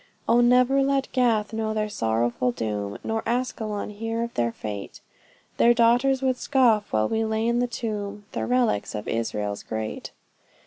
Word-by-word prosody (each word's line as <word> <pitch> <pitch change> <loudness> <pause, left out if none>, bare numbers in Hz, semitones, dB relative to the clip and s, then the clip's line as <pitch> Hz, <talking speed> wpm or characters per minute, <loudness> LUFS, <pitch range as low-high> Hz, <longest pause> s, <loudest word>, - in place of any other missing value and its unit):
O 240 - +5
never 250 +3 +4
let 275 0 0
Gath 230 -4 +1
know 220 -1 -2
their 215 0 0
sorrowful 120 - 0
doom, 105 -3 -3
Nor 225 0 -1
Askelon 225 -4 -2
hear 225 +2 -3
of 235 - -5
their 120 -1 0
fate; 105 -3 -7 0.6
Their 240 0 +5
daughters 245 +3 +3
would 260 -1 +1
scoff 240 -8 +2
while 110 0 +2
we 225 0 0
lay 220 0 -1
in 235 0 +2
the 245 - +1
tomb, 210 -3 -5
The - - -3
relics 245 - +1
of 105 - -5
Israel's 105 -3 -2
great. 110 0 -5
220 Hz, 165 wpm, -25 LUFS, -, 0.6 s, O